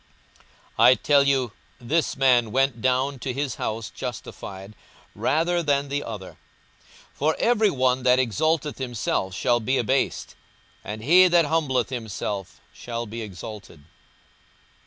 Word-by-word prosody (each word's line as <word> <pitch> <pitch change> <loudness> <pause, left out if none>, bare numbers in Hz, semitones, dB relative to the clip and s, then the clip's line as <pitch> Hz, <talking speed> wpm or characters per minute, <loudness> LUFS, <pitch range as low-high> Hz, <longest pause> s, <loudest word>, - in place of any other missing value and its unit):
42:018:014 115 - +7
I 130 - +7
tell 140 0 +3
you, 130 -4 +1 0.3
this 150 +7 -1
man 125 -4 +3
went 135 -2 +1
down 130 +2 0
to 130 +2 -3
his 135 -2 -3
house 110 0 -3
justified 95 +2 -7 0.4
rather 170 +3 +1
than 140 -3 0
the 145 +1 -2
other: 105 -5 -8 0.8
for 155 +3 0
every 220 -3 +3
one 130 -5 +1
that 125 0 +4
exalteth 145 - 0
himself 115 -7 -2
shall 120 +3 +2
be 130 +4 0
abased; 130 +3 -1 0.5
and 105 +1 -7
he 180 +7 +7
that 175 -2 +4
humbleth 145 -6 0
himself 105 -5 -5
shall 120 -1 -5
be 115 +2 -7
exalted. 100 -5 -9
130 Hz, 135 wpm, -24 LUFS, 115-145 Hz, 0.8 s, 42:018:014